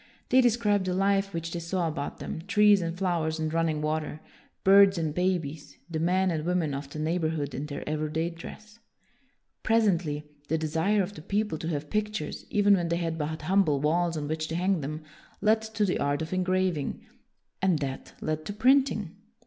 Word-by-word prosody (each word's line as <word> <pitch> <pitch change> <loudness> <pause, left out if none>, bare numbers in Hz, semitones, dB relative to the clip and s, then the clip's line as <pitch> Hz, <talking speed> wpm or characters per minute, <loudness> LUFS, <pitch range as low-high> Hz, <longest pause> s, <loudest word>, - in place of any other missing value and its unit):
They 260 - +6
described 215 -5 +2
the 180 -1 -1
life 195 +1 +2
which 165 -2 -4
they 175 - -3
saw 170 +1 -1
about 145 -3 -4
them, - - -5
trees 210 -1 +5
and 170 0 -3
flowers 170 -4 0
and 155 0 -2
running 160 -2 0
water, 155 0 -2 0.4
birds 195 0 +7
and 160 -3 -1
babies, 165 -4 -2
the 160 - -2
men 185 +3 +2
and 155 -2 -2
women 170 -4 0
of 140 0 -5
the 150 - -8
neigh 160 +3 0
borhood 155 -4 -2
in 140 +4 -4
their 145 -1 -6
everyday 155 +2 -1
dress. 210 +6 -11 0.8
Pres 225 0 +3
ently, 160 -6 0 0.2
the 160 - +1
desire 165 +6 +1
of 185 - -6
the 175 - -10
people 205 -1 -1
to 160 - -4
have 150 -2 -3
pictures, 210 -6 -3
even 205 -1 +4
when 175 -3 +2
they 170 - +1
had 165 -1 -2
but 155 +1 -3
humble 175 -4 +3
walls 165 +3 +1
on 145 -1 -3
which 155 +1 -2
to 160 - -4
hang 180 0 +1
them, 155 +3 -5 0.4
led 220 +2 +3
to 220 -1 -1
the 185 - 0
art 145 +2 0
of 160 - -5
engraving; 185 -4 0 0.6
and 185 -4 +3
that 135 -2 -5
led 155 0 -2
to 205 - -4
printing. 225 - +2
170 Hz, 195 wpm, -28 LUFS, 155-195 Hz, 0.8 s, birds